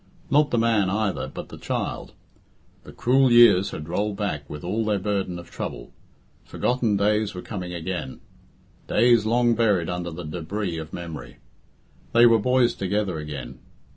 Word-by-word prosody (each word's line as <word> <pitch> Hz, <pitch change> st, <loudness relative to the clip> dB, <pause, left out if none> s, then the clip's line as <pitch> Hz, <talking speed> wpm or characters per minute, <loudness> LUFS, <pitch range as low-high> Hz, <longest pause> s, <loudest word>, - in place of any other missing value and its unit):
Not 150 Hz, 0 st, +4 dB
the 120 Hz, -, 0 dB
man 115 Hz, -4 st, +2 dB
either, 105 Hz, 0 st, -1 dB
but -, -, -8 dB
the -, -, -10 dB
child. -, -, -4 dB, 0.7 s
The -, -, -10 dB
cruel 130 Hz, +1 st, +3 dB
years 115 Hz, -5 st, +6 dB
had 75 Hz, -4 st, -7 dB
rolled 100 Hz, +4 st, -2 dB
back 75 Hz, -9 st, -3 dB
with 75 Hz, +3 st, -8 dB
all 105 Hz, +6 st, -1 dB
their 105 Hz, -1 st, +1 dB
burden 95 Hz, -2 st, -2 dB
of 85 Hz, 0 st, -11 dB
trouble. -, -, -6 dB, 0.5 s
Forgotten 120 Hz, -5 st, 0 dB
days 105 Hz, 0 st, +1 dB
were 90 Hz, -, -6 dB
come 105 Hz, -4 st, -5 dB
again 90 Hz, -5 st, -5 dB, 0.7 s
days 120 Hz, -3 st, +4 dB
long 120 Hz, +1 st, +3 dB
buried 105 Hz, -8 st, +1 dB
under 90 Hz, -1 st, -3 dB
the 85 Hz, +1 st, -7 dB
débris 85 Hz, +2 st, -4 dB
of 80 Hz, 0 st, -10 dB
memory. 80 Hz, -9 st, -8 dB, 0.8 s
They 120 Hz, +1 st, +7 dB
were 115 Hz, -1 st, +6 dB
boys 125 Hz, +2 st, +2 dB
together 100 Hz, -3 st, -2 dB
again. 75 Hz, -2 st, -7 dB
100 Hz, 160 wpm, -24 LUFS, 85-115 Hz, 0.8 s, They